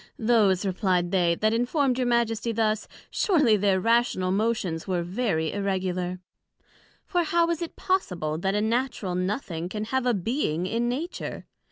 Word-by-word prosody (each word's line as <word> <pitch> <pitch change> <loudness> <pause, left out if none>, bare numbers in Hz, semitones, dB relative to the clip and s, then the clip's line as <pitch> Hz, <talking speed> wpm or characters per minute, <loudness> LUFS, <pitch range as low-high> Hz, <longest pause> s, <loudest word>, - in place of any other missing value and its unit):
Those, 215 -5 +3
replied 185 -2 0
they, 175 -3 +3
that 215 +4 +1
informed 250 +2 +1
your 250 - +1
Majesty 235 -1 +1
thus, 215 -1 0 0.2
surely 295 - +3
their 200 -2 +2
rational 230 -4 +2
motions 195 -5 -1
were 180 -2 0
very 175 -4 -1
irregular; 185 -2 -2 0.9
For 355 -2 +1
how 335 +1 +2
is 335 - -2
it 340 - -5
possible, 180 - -1
that 195 +3 0
a 210 - +1
Natural 230 -4 -1
nothing 180 -2 -2
can 210 +2 -4
have 250 +3 -1
a 245 - +3
being 180 - -1
in 230 +5 0
Nature? 315 +9 -4
215 Hz, 155 wpm, -26 LUFS, 185-240 Hz, 0.9 s, Those